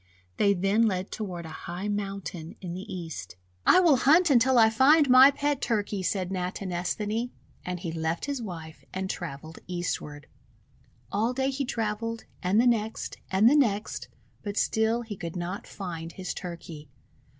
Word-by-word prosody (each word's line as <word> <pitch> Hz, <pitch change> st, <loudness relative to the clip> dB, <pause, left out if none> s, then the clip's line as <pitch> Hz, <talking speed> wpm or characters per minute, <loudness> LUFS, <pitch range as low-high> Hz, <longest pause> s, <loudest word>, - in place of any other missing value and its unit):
They 200 Hz, -1 st, +4 dB
then 200 Hz, +5 st, +3 dB
led 190 Hz, -2 st, -2 dB
toward 180 Hz, -6 st, -5 dB
a -, -, -7 dB, 0.2 s
high 180 Hz, +4 st, -4 dB
mountain 195 Hz, -5 st, -4 dB
in 175 Hz, -3 st, -6 dB
the 190 Hz, +4 st, -7 dB
East. 160 Hz, -, -6 dB, 0.3 s
'I -, -, +8 dB
will 320 Hz, -7 st, +5 dB
hunt 315 Hz, +6 st, +5 dB
until 255 Hz, 0 st, +5 dB
I 220 Hz, -1 st, +6 dB
find 280 Hz, +6 st, +5 dB
my 260 Hz, +2 st, +10 dB
pet 285 Hz, 0 st, -1 dB
Turkey," 205 Hz, -4 st, -1 dB
said 185 Hz, 0 st, -1 dB
Natinesthani, 190 Hz, +5 st, -2 dB, 0.3 s
and 180 Hz, -1 st, -4 dB
he 170 Hz, -, -3 dB
left 160 Hz, +1 st, -2 dB
his 280 Hz, -3 st, -3 dB
wife 165 Hz, -7 st, -8 dB
and 190 Hz, 0 st, -3 dB
travelled 160 Hz, -1 st, -7 dB
eastward. 170 Hz, -5 st, -4 dB, 0.9 s
All 225 Hz, +5 st, +1 dB
day 265 Hz, +1 st, 0 dB
he 275 Hz, +1 st, -2 dB
travelled, 230 Hz, -1 st, -2 dB, 0.2 s
and 190 Hz, +4 st, +2 dB
the 240 Hz, -, +4 dB
next, 225 Hz, -2 st, 0 dB
and 190 Hz, +4 st, +4 dB
the 275 Hz, -, +6 dB
next, 210 Hz, -, +1 dB, 0.3 s
but 205 Hz, 0 st, -5 dB
still 220 Hz, +2 st, +1 dB
he 220 Hz, -3 st, -6 dB
could 170 Hz, -2 st, -6 dB
not 180 Hz, +3 st, -4 dB
find 170 Hz, -4 st, -6 dB
his 185 Hz, -1 st, -5 dB
Turkey. 170 Hz, -4 st, -8 dB
200 Hz, 160 wpm, -27 LUFS, 175-230 Hz, 0.9 s, my